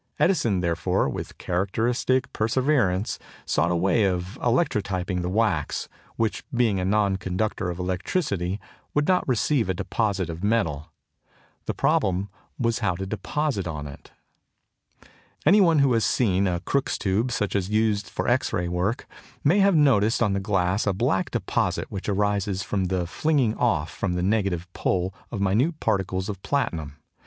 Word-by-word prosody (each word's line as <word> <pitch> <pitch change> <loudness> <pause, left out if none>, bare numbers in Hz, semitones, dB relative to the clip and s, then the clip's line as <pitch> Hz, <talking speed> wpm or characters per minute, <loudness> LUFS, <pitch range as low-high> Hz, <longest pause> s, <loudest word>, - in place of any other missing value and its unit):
Edison, 115 - +2
therefore, 85 -2 0
with - - -5
characteristic 120 +8 0
perseverance, 110 -4 +1 0.3
sought 80 +4 +1
a 90 - +1
way 95 +5 +2
of 90 +1 -2
electrotyping 100 - 0
the 90 - -2
wax, 100 -7 0 0.3
which, 115 -1 -1
being 120 -6 +2
a 90 - -1
non 100 -1 +2
conductor 95 0 -2
of 85 - -4
electricity, 95 - -1 0.4
would 150 0 +2
not 185 -1 +2
receive 125 -2 +1
a 95 - 0
deposit 100 -2 -1
of 85 +2 -7
metal. 85 -8 0 0.8
The - - -2
problem 95 +2 +1 0.3
was 115 -2 0
how 95 -6 0
to 95 +2 -4
deposit 110 +2 -2
on 75 -3 -4
it. 70 -1 -11 1.4
Any 200 +7 +6
one 165 -4 +4
who 140 -3 +4
has 115 -1 +2
seen 100 -5 +2
a 90 -1 -1
Crookes' 135 +9 0
tube 105 +6 0
such 105 -4 -1
as 100 -2 +1
is - - -8
used 105 -2 +1
for - - -3
X - - +2
ray 90 0 -1
work 90 +7 -1 0.4
may 170 +8 +4
have 200 -2 +4
noticed 120 -7 +4
on 105 -4 +1
the 100 - 0
glass 95 +1 0
a 100 - +3
black 95 -1 0
deposit - - -1
which 100 +1 -4
arises 100 -1 0
from 95 -2 -1
the 90 -1 -1
flinging 130 - +1
off 85 -11 0
from 95 -3 -2
the 90 - -1
negative 95 -3 0
pole 90 0 -1 0.2
of 105 - -4
minute 120 - +1
particles 95 -1 -1
of 100 -3 -5
platinum. 85 - -2
100 Hz, 165 wpm, -25 LUFS, 90-115 Hz, 1.4 s, Any